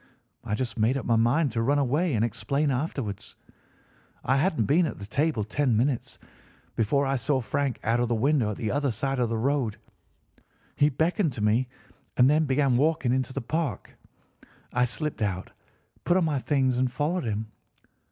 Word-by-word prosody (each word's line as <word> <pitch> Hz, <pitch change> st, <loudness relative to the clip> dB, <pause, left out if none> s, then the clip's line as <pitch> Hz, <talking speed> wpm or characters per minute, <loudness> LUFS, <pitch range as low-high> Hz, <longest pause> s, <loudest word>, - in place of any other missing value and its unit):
I 105 Hz, -, -2 dB
just 120 Hz, 0 st, -4 dB
made 115 Hz, +5 st, +2 dB
up 130 Hz, -, -5 dB
my 115 Hz, -, +2 dB
mind 120 Hz, +6 st, +2 dB
to 115 Hz, +1 st, -1 dB
run 140 Hz, +5 st, +2 dB
away 145 Hz, +3 st, +1 dB
and 110 Hz, +1 st, +2 dB
explain 140 Hz, +6 st, -1 dB
afterwards. 125 Hz, -6 st, -4 dB, 0.9 s
I 135 Hz, +2 st, +2 dB
hadn't 150 Hz, -, +1 dB
been 160 Hz, -, +3 dB
at -, -, -6 dB
the 100 Hz, -, -8 dB
table 140 Hz, +1 st, 0 dB
ten 120 Hz, +2 st, 0 dB
minutes 130 Hz, +2 st, -1 dB, 0.6 s
before 140 Hz, +6 st, +1 dB
I 135 Hz, 0 st, 0 dB
saw 135 Hz, +3 st, 0 dB
Frank 135 Hz, +2 st, -2 dB
out 115 Hz, +2 st, +1 dB
of 120 Hz, -, +1 dB
the 120 Hz, -, 0 dB
window 130 Hz, -1 st, +2 dB
at 105 Hz, -, -4 dB
the 110 Hz, -4 st, -2 dB
other 145 Hz, -1 st, 0 dB
side 135 Hz, +3 st, -2 dB
of 120 Hz, -2 st, +1 dB
the 115 Hz, -, -1 dB
road. 125 Hz, -2 st, 0 dB, 1.0 s
He 145 Hz, -, +4 dB
beckoned 160 Hz, -, 0 dB
to 105 Hz, -, -4 dB
me 115 Hz, +5 st, +2 dB, 0.5 s
and 125 Hz, -, +6 dB
then 155 Hz, +3 st, +3 dB
began 135 Hz, -2 st, +2 dB
walking 145 Hz, -3 st, +2 dB
into 130 Hz, 0 st, -1 dB
the 135 Hz, -, -4 dB
Park. 155 Hz, +3 st, -3 dB, 0.8 s
I 125 Hz, 0 st, +3 dB
slipped 140 Hz, +3 st, -4 dB
out, 95 Hz, -3 st, -2 dB, 0.5 s
put 175 Hz, -, +3 dB
on 180 Hz, -, +2 dB
my 150 Hz, -3 st, 0 dB
things, 130 Hz, -2 st, +1 dB
and 130 Hz, -1 st, +1 dB
followed 150 Hz, +5 st, -1 dB
him. 110 Hz, 0 st, -3 dB
130 Hz, 185 wpm, -26 LUFS, 115-145 Hz, 1.0 s, and